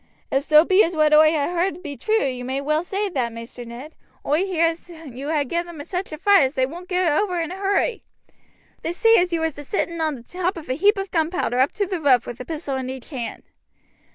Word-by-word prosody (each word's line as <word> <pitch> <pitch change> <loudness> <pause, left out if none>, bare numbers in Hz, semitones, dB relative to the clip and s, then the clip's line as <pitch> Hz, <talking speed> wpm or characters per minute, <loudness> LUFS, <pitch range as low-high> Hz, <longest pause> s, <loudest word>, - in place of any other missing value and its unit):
"If 270 +1 +1
so 305 +2 +6
be 380 +4 +5
as 335 +1 -2
what 305 -1 +3
oi 310 +1 +7
ha' 310 +2 -1
heard 355 0 -1
be 285 -2 -6
true 440 +5 +1
you 255 -2 -3
may 260 +2 -2
well 305 +3 0
say 400 +3 -2
that, 255 -9 -1
Maister 230 +2 -9
Ned. 245 +7 -9 0.3
Oi 310 +7 +2
hear 335 -3 +2
as 330 +1 -3
you 290 -5 -8
ha' 295 -3 +1
gived 340 +6 -2
'em 315 -4 -8
such 365 +3 -4
a 310 - -5
fright 395 +2 +5
as 265 +1 +1
they 260 - +2
won't 345 +6 -9
get 360 -3 +2
over 360 +3 0
in 330 0 -3
a - - -5
hurry. 400 +3 0 0.8
They 335 - -3
say 455 +5 +5
as 355 0 +2
you 335 -1 0
was 320 -3 -2
a - - -7
sitting 335 +1 -2
on 310 -2 0
the 235 - -12
top 360 +6 -3
of 310 -5 -9
a - - +1
heap 405 +9 +3
of 390 -1 -4
gunpowder 320 -6 0
up 265 +3 +3
to 410 - -1
the 370 -3 -4
roof 260 -5 +4
with 240 - -7
a 250 - -6
pistol 300 -4 -4
in 260 -1 -4
each 260 +3 -8
hand." 245 -5 -5
320 Hz, 255 wpm, -22 LUFS, 275-360 Hz, 0.8 s, oi